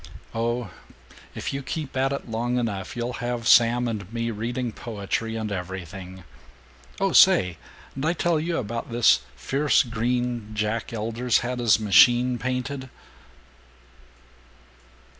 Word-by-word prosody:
Oh, 115 -2 -2 0.6
if - - -4
you 140 - -3
keep 145 +1 -5
at 135 +1 +1
it 140 - -4
long 120 +2 -1
enough 100 -6 -3
you'll 120 +1 -2
have 120 -1 -2
Sam 120 +1 +5
and 105 -4 -5
me 115 0 -2
reading 120 +3 -3
poetry 110 0 -4
and 110 -2 -3
everything. 95 0 -6 0.8
Oh - - +1
say, 90 -3 +5 0.4
d' 135 - -5
I 165 - +2
tell 170 -2 +1
you 170 +2 -2
about 115 0 -4
this 120 -1 +5 0.2
fierce 140 -1 +2
green 120 -2 -2
Jack 105 +1 -2
Elder's 115 +2 0
had 125 0 -3
his 115 -3 +4
machine 120 +4 +5
painted?" 130 +1 -3
120 Hz, 130 wpm, -25 LUFS, 110-125 Hz, 0.8 s, Sam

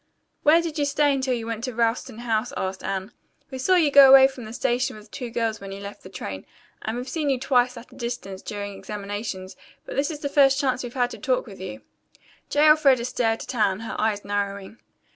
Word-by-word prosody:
"Where 330 +3 +5
did 325 -2 -4
you 290 - +2
stay 290 0 +2
until 260 -2 0
you 230 -2 -5
went 230 0 -4
to 255 -3 -5
Ralston 230 +1 0
House?" 225 +1 0
asked 190 0 -3
Anne. 195 +2 -3 0.4
"We 260 - -6
saw 370 +8 +3
you 320 -5 +3
go 275 -1 +9
away 265 0 +9
from 260 -3 -9
the 215 - -8
station 250 +2 0
with 210 0 -15
two 250 -3 -5
girls 225 -2 -2
when 195 0 -8
you 195 - -7
left 200 0 -9
the 185 - -12
train, 95 - -7 0.3
and 220 +2 -3
we've 250 +1 -5
seen 300 0 -1
you 265 -2 +1
twice 250 -1 +2
at 235 - -12
a - - -15
distance 235 -6 -5
during 205 -1 -5
examinations, 200 -1 -6 0.3
but - - -7
this 280 +2 +1
is 300 -2 -6
the 285 - -1
first 275 -1 +4
chance 260 -3 0
we've 245 0 -7
had 245 -1 +1
to - - -9
talk - - 0
with - - -11
you." - - -7 0.7
J. 295 +1 +3
Elfreda 280 -6 +5
stared 230 -2 0
at - - -6
Anne, 210 -4 +1
her 225 - -5
eyes 210 -2 0
narrowing. 200 +1 -3
240 Hz, 230 wpm, -24 LUFS, 210-270 Hz, 0.7 s, go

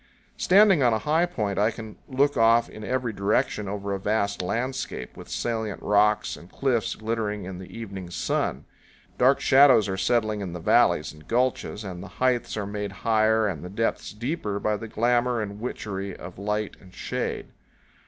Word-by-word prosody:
Standing 195 -3 +5
on 120 -3 +4
a - - +2
high 160 +4 +3
point, 105 - -2
I 105 +2 +4
can 110 -1 -8
look 140 +2 +2
off 115 +1 +4
in 110 - -10
every 125 0 -1
direction 105 +2 0
over 100 0 -3
a 100 - -2
vast 100 0 0
landscape, 115 - -3
with - - -11
salient 110 -3 -2
rocks 105 +1 +2
and 85 - -14
cliffs 130 -5 0
glittering 110 -3 -3
in 90 -1 -7
the 95 - -9
evening 100 -6 -7
sun. 85 - -2 0.5
Dark 130 +2 +5
shadows 135 -6 +6
are 95 -1 -2
settling 110 +1 +1
in 90 -3 -5
the 90 - -5
valleys 75 -2 +3
and 75 0 -17
gulches, 120 -3 0
and 90 -3 -6
the 95 - -8
heights 125 -3 +1
are 105 - -2
made 105 0 -4
higher 110 0 +3
and 85 -6 -4
the 90 - -6
depths 115 +4 -2
deeper 105 -2 -3
by 105 0 0
the 110 +2 -6
glamour 120 +2 +1
and 105 -1 -5
witchery 100 -5 -4
of 90 +1 -10
light 105 +1 -2
and 90 -1 -17
shade. - - -3
110 Hz, 180 wpm, -25 LUFS, 100-120 Hz, 0.5 s, shadows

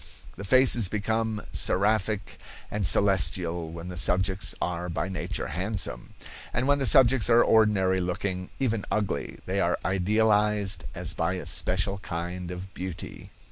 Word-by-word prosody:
The 100 - -8
faces 120 -2 +4
become 110 +1 -2
seraphic 105 +1 +1 0.3
and 105 -4 0
celestial 85 -3 +2
when 85 +2 -8
the 90 - -8
subjects 95 +3 +1
are 90 0 -3
by 85 +2 -3
nature 95 - -4
handsome, 95 +6 -4 0.4
and 125 +2 -1
when 145 0 +3
the 135 - +1
subjects 130 0 +5
are 120 0 +5
ordinary 95 -4 +2
looking, 90 +1 -3
even 115 -6 -1
ugly, 105 -2 -2
they 95 +2 -2
are 85 0 +1
idealized 105 +1 +1
as - - +1
by 85 +3 -1
a 90 - -6
special 95 +2 0
kind 90 0 -6
of 90 +1 -8
beauty." 90 -2 -8
95 Hz, 140 wpm, -26 LUFS, 90-110 Hz, 0.4 s, subjects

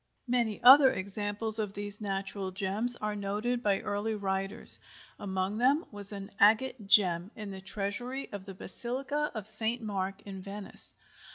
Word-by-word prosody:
Many 235 -4 0
other 265 +2 +9
examples 205 +1 -3
of 210 -2 -3
these 205 +1 -6
"natural 195 -1 -3
gems" 200 +6 +1
are 210 -2 -3
noted 210 +5 -2
by 200 -4 +1
early 205 +2 -2
writers. 195 -1 +4 0.4
Among 190 +1 -2
them 275 +7 +3
was 205 -1 -3
an 195 -1 -7
agate 220 +1 +3
gem 180 -3 +4
in 210 -2 -7
the 190 0 -8
treasury 215 +8 -4
of 200 -2 -7
the 195 -1 -9
Basilica 270 +9 -3
of 215 -3 -5
St. 220 +2 -2
Mark, 195 -3 -4
in 195 -2 -8
Venice. 200 +1 -10
205 Hz, 155 wpm, -30 LUFS, 195-230 Hz, 0.4 s, other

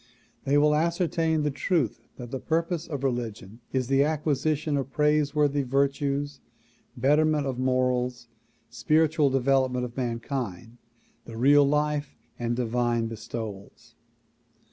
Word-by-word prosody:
They 140 +1 +3
will 150 +1 +4
ascertain 165 -1 +1
the 150 - 0
truth 135 - -1
that 120 -2 -8
the 135 - -3
purpose 165 +2 -1
of 140 -4 -5
religion 115 -5 -3
is 130 -1 0
the 135 +2 +3
acquisition 150 0 0
of 135 -1 -2
praiseworthy 150 -1 +2
virtues, 140 +1 -1 0.6
betterment 150 +3 +2
of 130 -2 -3
morals, 125 -1 0 0.4
spiritual 155 -1 +2
development 130 -1 +1
of 120 -1 -9
mankind, 115 -3 -4 0.5
the 115 - -9
real 140 +3 +5
life 150 0 -1 0.2
and 120 0 -1
divine 120 -1 0
bestowals. 110 -2 -8
135 Hz, 120 wpm, -26 LUFS, 125-150 Hz, 0.6 s, real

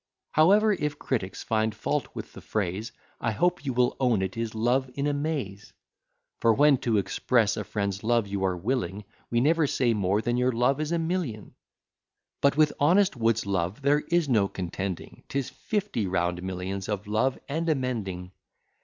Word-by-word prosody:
However, 205 +7 +5
if 150 -5 -2
critics 100 -11 -3
find 110 -1 0
fault 145 +6 -1
with - - -7
the - - -10
phrase, 105 +1 -2 0.3
I - - 0
hope 175 +8 +1
you 135 - -1
will 125 0 +2
own 120 -7 +2
it 95 - -3
is 115 -1 -3
Love 125 +4 +1
in 140 - -1
a 145 - +1
Maze: 140 -10 -3 0.7
For 115 -1 +4
when 145 -1 +5
to 115 -3 +1
express 110 +3 +1
a 105 - -3
friend's 100 0 -3
love 115 -1 +2
you 100 -1 -3
are 95 -1 +1
willing, 105 -1 -2 0.3
We 120 0 +2
never 160 +2 +3
say 125 -3 +1
more 100 -1 +1
than 120 +2 0
your 125 0 +2
love 125 +5 +2
is 155 +1 -2
a 170 - +2
million; 165 - -3 0.9
But 140 0 +3
with 155 -1 +4
honest 180 +5 +4
Wood's 115 -2 +1
love 95 +5 -2
there 145 +1 +4
is 170 -2 +2
no 110 -7 +3
contending, 95 0 -5
'Tis 135 -2 -2
fifty 205 - -2
round 90 -1 0
millions 95 +2 -4
of 105 -1 -2
love 110 +5 +1
and 165 +4 -1
a 155 - +4
mending. 100 -9 -3
115 Hz, 180 wpm, -27 LUFS, 100-145 Hz, 0.9 s, However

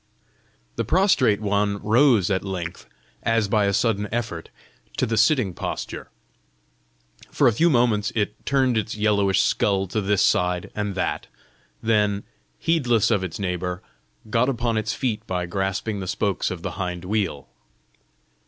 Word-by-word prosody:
The - - 0
prostrate 140 - +3
one 100 0 0
rose 115 -4 +4
at 95 - 0
length, 90 -3 -5 0.3
as 115 -2 +1
by 105 0 +2
a 100 - +2
sudden 105 -1 0
effort, 115 -8 -4 0.5
to - - +2
the 115 - -1
sitting 110 - +3
posture. - - -5 1.2
For - - +3
a 120 - +4
few 165 +10 +3
moments 120 -6 +2
it 105 -1 -2
turned 130 -4 +2
its 110 +1 -4
yellowish 100 -3 +2
skull 95 -2 +1
to 110 - -1
this 100 0 +2
side 90 0 +1
and 105 -2 -3
that; - - -2 0.6
then, 105 -2 +1 0.3
heedless 125 -10 +2
of 100 -4 +2
its 90 -4 -5
neighbour, 90 -2 -3 0.4
got 115 +4 +2
upon 120 -3 -1
its 110 -1 -1
feet 115 -5 -2
by 90 -1 -2
grasping 95 +3 -2
the 95 - -5
spokes 100 +1 -1
of 90 -2 -6
the - - -3
hind 90 -1 -4
wheel. 95 -9 -2
105 Hz, 150 wpm, -23 LUFS, 95-115 Hz, 1.2 s, rose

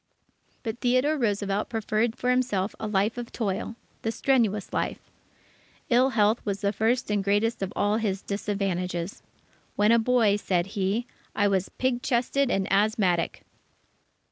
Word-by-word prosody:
But 225 0 -4
Theodore 255 +5 +2
Roosevelt 205 -5 -1
preferred 225 +1 0
for 250 -1 0
himself 235 -6 0
a 220 - -3
life 210 +3 0
of 240 - -7
toil 210 0 -3 0.3
the 225 - -1
strenuous 225 -6 +1
life. - - -1 0.9
Ill 250 +3 +5
health 215 +2 +3
was 200 -2 -3
the 200 0 +1
first 225 +2 0
and 205 -1 +1
greatest 205 +4 +1
of 195 0 -2
all 205 +1 +2
his 200 -4 -2
disadvantages. 195 -3 -2 0.5
"When 210 +2 +4
a 235 - +5
boy," 225 -3 +3
said 180 -4 0
he, 200 +4 0 0.3
"I 205 - +3
was 190 -2 0
pig 255 -1 -1
chested 255 +3 +1
and 195 -5 0
asthmatic." 200 -4 +1
210 Hz, 145 wpm, -26 LUFS, 200-235 Hz, 0.9 s, Ill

